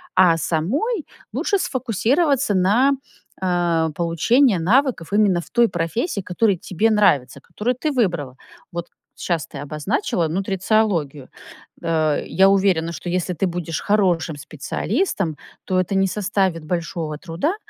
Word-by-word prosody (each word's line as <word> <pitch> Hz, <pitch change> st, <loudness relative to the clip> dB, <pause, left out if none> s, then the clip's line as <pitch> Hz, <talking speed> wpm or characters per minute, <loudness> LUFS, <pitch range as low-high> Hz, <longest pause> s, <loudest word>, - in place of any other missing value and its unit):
а 175 Hz, -3 st, +5 dB
самой 270 Hz, -, -1 dB, 0.3 s
лучше 400 Hz, -, 0 dB
сфокусироваться 260 Hz, -, +1 dB
на, 225 Hz, +10 st, +4 dB, 0.5 s
а, 175 Hz, -3 st, +1 dB
получении 185 Hz, -, +3 dB
навыков 205 Hz, -, +1 dB
именно 205 Hz, -4 st, +3 dB
в -, -, -15 dB
той 235 Hz, -1 st, +4 dB
профессии, 205 Hz, -, -2 dB
которая 190 Hz, +2 st, +1 dB
тебе 185 Hz, +6 st, 0 dB
нравится, 140 Hz, -, +2 dB
которую 240 Hz, -, -2 dB
ты 300 Hz, +5 st, -2 dB
выбрала. 170 Hz, -, -1 dB, 0.3 s
Вот 170 Hz, 0 st, -5 dB, 0.3 s
щас 165 Hz, -4 st, -2 dB
ты 150 Hz, -3 st, -10 dB
обозначила 150 Hz, +3 st, -1 dB
нутрициологию. 185 Hz, -, 0 dB, 0.5 s
Э, 155 Hz, -2 st, +1 dB
я 190 Hz, +1 st, +4 dB
уверена, 190 Hz, -4 st, +2 dB
что 170 Hz, +1 st, -6 dB
если 180 Hz, +1 st, -1 dB
ты 185 Hz, +3 st, 0 dB
будешь 170 Hz, -2 st, -4 dB
хорошим 180 Hz, -6 st, +1 dB
специалистом, 170 Hz, -, -2 dB, 0.3 s
то 185 Hz, -1 st, +1 dB
это 185 Hz, +2 st, -1 dB
не 195 Hz, 0 st, +3 dB
составит 190 Hz, -4 st, -1 dB
большого 165 Hz, -2 st, -3 dB
труда 185 Hz, -, -2 dB
185 Hz, 130 wpm, -21 LUFS, 165-215 Hz, 0.5 s, а